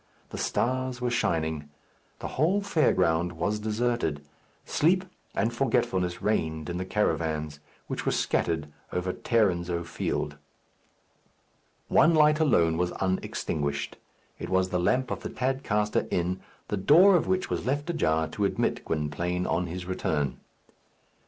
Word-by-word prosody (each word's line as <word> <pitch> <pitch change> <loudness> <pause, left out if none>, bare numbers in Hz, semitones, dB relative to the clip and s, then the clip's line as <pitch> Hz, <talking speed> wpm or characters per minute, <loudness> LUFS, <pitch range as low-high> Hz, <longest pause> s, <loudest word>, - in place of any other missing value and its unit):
The - - -5
stars 130 0 -1
were 125 -1 -1
shining. 80 -8 -1 0.5
The - - -4
whole 170 +9 +2
fair 195 -6 +2
ground 85 0 +1
was 105 +6 -1
deserted. 110 -9 -1 0.4
Sleep 180 +4 +2 0.3
and 115 +1 +1
forgetfulness 110 -8 0
reigned 80 -6 0
in 85 - -3
the 95 - -3
caravans 80 -7 -1 0.3
which - - -4
were - - +1
scattered 80 -3 0 0.2
over 90 0 -1
Tarrinzeau 90 -7 +1
Field. 80 - -3 1.5
One 165 - +5
light 150 0 +5
alone 85 - +3
was 90 0 0
unextinguished. 75 -6 -2 0.4
It - - -5
was 95 0 +2
the 90 - 0
lamp 125 +9 +1
of - - -2
the - - -6
Tadcaster 125 -5 0
Inn, 90 +1 -1 0.3
the 105 - -1
door 170 - +6
of 175 - +2
which 185 0 0
was - - -2
left 145 +3 0
ajar 80 - +1
to 105 - -1
admit 100 - 0
Gwynplaine 85 +4 -2
on 85 +4 0
his 90 +2 -5
return. 75 -6 -1
95 Hz, 140 wpm, -27 LUFS, 80-125 Hz, 1.5 s, door